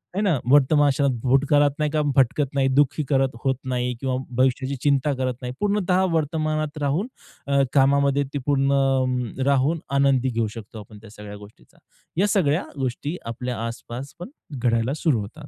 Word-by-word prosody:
हे 200 - 0
ना. 185 -8 +2
वर्तमान 145 +1 +5
क्षणात, 140 0 +1
भूतकाळात 145 +2 +3
नाही 150 -1 0
का 155 - +1
भटकत 135 +1 +2
नाही 135 -1 +2
दुःखी 145 +2 +2
करत 135 -1 +2
होत 135 -1 +1 0.2
नाही 125 0 -1
किंवा 130 -1 -1 0.2
भविष्याची 130 +1 +1
चिंता 140 0 +2
करत 130 -1 -1
नाही. 125 0 -5
पूर्णतः 200 -3 +1
वर्तमानात 155 -1 -1
राहून 145 - 0 0.4
अ, 140 0 +3
कामामध्ये 140 0 +3
ती - - -1
पूर्ण 135 -3 +1
राहून 140 +4 +2 0.2
आनंदी 135 -2 +2
घेऊ 115 -2 -1
शकतो 110 0 -9
आपण 105 0 -13
त्या 110 - -13
सगळ्या 105 -1 -10
गोष्टीचा. 105 +1 -17 0.4
या 200 +3 +3
सगळ्या 175 -5 +1
गोष्टी 135 +6 -3
आपल्या 120 +2 -4
आसपास 120 +3 -8
पण 175 - -7 0.3
घडायला 115 +2 +1
सुरू 150 -9 +2
होतात. 145 +9 -10
140 Hz, 165 wpm, -23 LUFS, 125-150 Hz, 0.4 s, वर्तमान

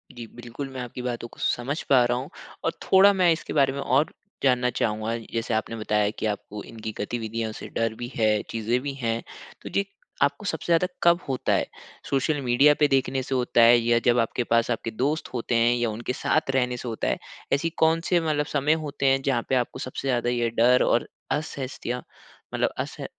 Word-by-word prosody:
जी, 120 - -7
बिल्कुल। 120 +3 -7
मैं 130 -1 -7
आपकी 125 +1 -6
बातों 120 -1 -4
को - - -18
समझ 135 +6 -1
पा 130 -3 +6
रहा 120 0 +1
हूँ। 135 +5 -5 0.3
और 165 - +1
थोड़ा 195 +1 +6
मैं 180 -3 +4
इसके 160 - -2
बारे 135 -2 +3
में 140 - -5
और 140 +3 +1 0.3
जानना 125 -2 +3
चाहूँगा। 110 0 -1 0.2
जैसे 115 0 -1
आपने 110 +1 -1
बताया 105 -1 +1
की - - -2
आपको 105 0 -4
इनकी 110 -1 -7
गतिविधियों 115 0 -3
से - - -8
डर 115 -1 0
भी 120 +2 -6
है, 110 -2 +2
चीज़ें 115 +2 0
भी 140 0 -4
हैं। 115 -3 -2 0.4
तो - - -7
जे 200 - 0 0.4
आपको 140 +7 +1
सबसे - - -3
ज़्यादा 170 +2 +4 0.2
कब 170 0 +5
होता 130 -2 0
है? - - +2 0.4
सोशल 140 +2 +1
मीडिया 135 +4 +5
पे 150 - +5
देखने 135 -1 +1
से 130 - -2
होता 125 -1 +2
है 120 +1 +8
या 115 0 +2
जब 120 0 +4
आपके 115 +1 0
पास 115 +1 +2
आपके 115 0 -2
दोस्त 145 +8 -1
होते 120 0 -1
हैं 120 +1 +4
या 120 -2 0
उनके 120 +4 -4
साथ - - 0
रहने 125 -1 +1
से 125 - -7
होता 115 - -2
है? - - +1 0.4
ऐसी 155 +4 +1
कौन 165 +1 +4
से 175 -2 +4
मतलब 150 -2 0
समय 145 +2 +3
होते 140 -1 -3
हैं 135 0 +4
जहाँ 130 -4 0
पे 130 - +2
आपको 125 -1 -1
सबसे 130 +1 -5
ज़्यादा 120 -1 +1
ये 120 -1 +1
डर 125 +2 +5
और 120 - +2 0.2
असहजता 130 -4 -3 0.5
मतलब - - +1
असह - - -4
125 Hz, 210 wpm, -25 LUFS, 115-140 Hz, 0.5 s, है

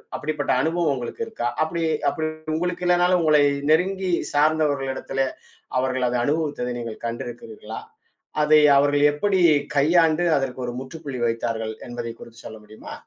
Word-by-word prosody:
அப்படிப்பட்ட 150 -1 -2
அனுபவம் 160 -1 +1
உங்களுக்கு 125 - -6
இருக்கா? 220 - -3 0.2
அப்படி 165 +1 -3 0.3
அப்படி 155 0 -2 0.3
உங்களுக்கு 180 +2 -2
இல்லேன்னாலும் 180 0 +3
உங்களை 150 -2 +5 0.3
நெருங்கி 185 +3 +2 0.2
சார்ந்தவர்களிடத்துல, 145 -3 0 0.6
அவர்கள் 130 -1 0
அத 125 - -1
அனுபவித்தத 145 -4 -1
நீங்க 115 -2 -5
கண்டிருக்கிறீர்களா? 115 -2 -6 0.6
அதை 155 0 +6 0.2
அவர்கள் 145 +1 +3
எப்படி 190 +5 +1 0.3
கையாண்டு 160 +3 +3
அதற்கு 130 -1 -3
ஒரு 120 - -4
முற்றுப்புள்ளி 140 -1 -7
வைத்தார்கள் 115 -1 -2 0.2
என்பதை 120 -1 -5
குறித்து 115 0 -13
சொல்ல 110 - -8
முடியுமா? 105 +1 -11
145 Hz, 130 wpm, -23 LUFS, 120-160 Hz, 0.6 s, அதை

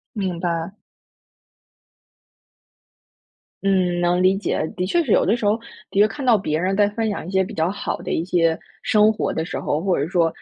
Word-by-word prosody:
明 185 -4 -2
白。 170 +1 -2 2.9
嗯， 180 -3 +2
能 175 +1 +2
理 185 +1 +4
解。 195 -5 -1
的 180 -2 -1
确 340 - +2
是 225 - +2
有 - - +4
的 220 +6 +2
时 215 - -4
候， 210 +2 +3 0.3
的 - - -6
确 210 - +7
看 270 +5 -4
到 235 -4 +5
别 155 -4 -1
人 190 +2 0
在 205 0 +4
分 220 +1 -2
享 200 - -4
一 185 - -7
些 190 - +3
比 190 - -4
较 165 +3 0
好 205 - -3
的 - - -5
一 165 - 0
些 165 -3 +1 0.2
生 215 0 +4
活 215 - -2
的 160 - -2
时 - - -5
候， 150 - -1
或 185 +1 0
者 140 - 0
说， 170 -1 +2
185 Hz, 220 characters per minute, -22 LUFS, 170-205 Hz, 2.9 s, 确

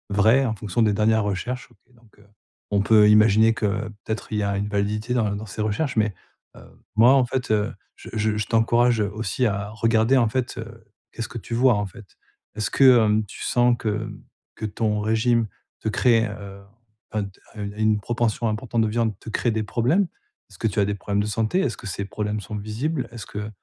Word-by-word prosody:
vraies 115 +6 +4
en 115 - 0
fonction 105 +1 -1
des 105 -2 +3
dernières 110 +1 +2
recherches, 105 +6 -3
OK, 125 - -27
donc, 115 -3 -24
heu, 105 - -21 0.4
on 100 -1 +2
peut 105 0 +6
imaginer 110 +1 +5
que 110 - -2 0.4
peut-être, 110 0 -4
il 105 - -1
y 105 - 0
a 100 0 0
une 100 +1 -2
validité 105 +3 -1
dans 105 -4 +1
dans 105 +2 -7
ces 105 +2 -4
recherches. 120 +7 -1
Mais, 110 -2 +1 0.4
heu, - - -13 0.3
moi, 120 +4 +7
en 130 -2 +4
fait, 130 0 -3
heu, 105 -1 +1 0.2
je - - -12
je 110 -1 0
je 105 - -1
t'encourage, 120 +1 +3
heu, 100 - 0
aussi 110 +4 -1
à 100 -1 -2
regarder, 115 +3 +2
en 120 -3 +3
fait, 130 +2 -2
heu, 115 0 -9 0.3
qu'est-ce 115 - -5
que 120 - -6
tu 115 - -5
vois, 125 +1 +5
en 105 -1 -1
fait? 110 +3 -13 0.5
Est-ce 110 -1 -2
que, 130 -3 +6
hem, 105 0 +2
tu 95 - -11
sens 120 0 +3
que, 110 - -2
hem, 105 0 -4 0.3
que 110 - -5
ton 105 0 -1
régime 115 +1 +2 0.3
te - - -1
crée, 115 +1 +3
heu, 100 -1 -9 0.5
enfin 105 -1 -1
de 100 - -7 0.3
une 100 0 -4
une 110 -1 +2
proportion 120 +1 -1
importante 115 +1 -1
de 110 - +1
viande 110 -2 -1
te - - -9
crée 115 +2 0
des 110 0 -1
problèmes? 125 - +1 0.4
Est-ce - - -16
que 115 - +1
tu 105 - -2
as 100 - +4
des 105 0 -2
problèmes 100 +1 -2
de - - -3
santé? 110 - 0
Est-ce 195 - 0
que - - -12
ces 100 +2 -4
problèmes 105 +1 -3
sont 105 +1 -7
visibles? 115 +9 -3
Est-ce 115 -3 -8
que 105 +1 -6
110 Hz, 220 wpm, -23 LUFS, 105-115 Hz, 0.5 s, moi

